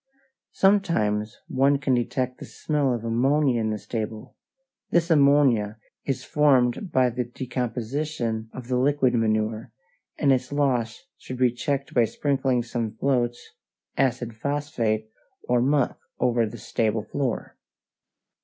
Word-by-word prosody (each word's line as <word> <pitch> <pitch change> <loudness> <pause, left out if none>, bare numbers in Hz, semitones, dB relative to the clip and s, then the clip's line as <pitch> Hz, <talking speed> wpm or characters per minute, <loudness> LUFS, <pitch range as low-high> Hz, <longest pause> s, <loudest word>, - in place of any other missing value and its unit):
Sometimes 120 - +2
one 140 +2 +3
can 135 -1 0
detect 125 +1 -1
the - - -7
smell 145 -4 -1
of 120 -2 -2
ammonia 130 +2 +2
in 110 - 0
the 110 - -1
stable. 110 0 -5 0.5
This 170 -2 +2
ammonia 140 -8 +4 0.3
is 135 - -2
formed 145 - +2
by 130 -3 +3
the 125 +1 -2
decomposition 120 -1 -3
of 125 -2 -9
the 125 -1 0
liquid 135 -1 +2
manure, 110 0 0 0.5
and 140 -3 +4
its 130 0 -2
loss 135 -1 0
should 130 - -7
be 125 -1 +3
checked 140 +3 -3
by 120 -2 +4
sprinkling 135 +1 0
some 115 -2 -3
floats, 120 -2 -1 0.4
acid 125 -3 0
phosphate, 115 -5 -1 0.4
or 125 -1 +2
muck 140 +1 +1 0.2
over 120 -2 +2
the - - -8
stable 110 -1 -1
floor. 130 +2 -3
125 Hz, 130 wpm, -25 LUFS, 115-140 Hz, 0.5 s, ammonia